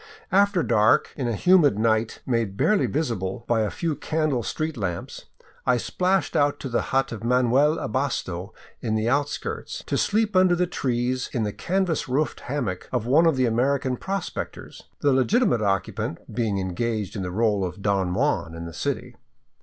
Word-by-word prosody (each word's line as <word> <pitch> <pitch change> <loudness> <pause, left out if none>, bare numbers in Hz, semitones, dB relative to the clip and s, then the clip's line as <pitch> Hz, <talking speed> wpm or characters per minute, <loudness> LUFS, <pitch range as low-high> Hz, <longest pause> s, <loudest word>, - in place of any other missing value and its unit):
After 200 -2 +3
dark, 105 0 +3
in 130 -4 -2
a 115 - -1
humid 165 - +4
night 110 0 +1
made 115 -6 -1
barely 210 - +3
visible 115 - -2
by 115 -2 +2
a 105 - 0
few 165 -3 -2
candle 155 -6 -1
street 155 +6 -3
lamps, 95 -7 -4 0.4
I 125 -1 +3
splashed 185 +9 0
out 145 0 +2
to 135 - -4
the 120 - +1
hut 135 0 +1
of 115 -2 -6
Manuel 125 +5 +3
Abasto 105 -7 -2 0.3
in 110 -2 -1
the 110 +1 0
outskirts, 145 - -2
to - - -1
sleep 215 -1 +1
under 185 -1 +5
the 180 +1 +1
trees 125 -5 -1
in 115 - 0
the 105 -1 -2
canvas 185 -6 -1
roofed 140 +2 0
hammock 120 -10 -4
of 125 -3 -1
one 150 +7 +5
of 160 - +3
the 130 -1 +2
American 130 +3 +1
prospectors, 195 +7 -5 0.2
the 145 -2 +3
legitimate 135 - +2
occupant 95 -4 -1 0.2
being 110 -3 0
engaged 100 +2 -2
in 100 - -3
the 90 - -3
role 105 0 +1
of 90 +2 -5
Don 95 -3 +1
Juan 80 - 0
in 85 0 -6
the 85 - -8
city. - - -3
125 Hz, 175 wpm, -24 LUFS, 105-155 Hz, 0.4 s, under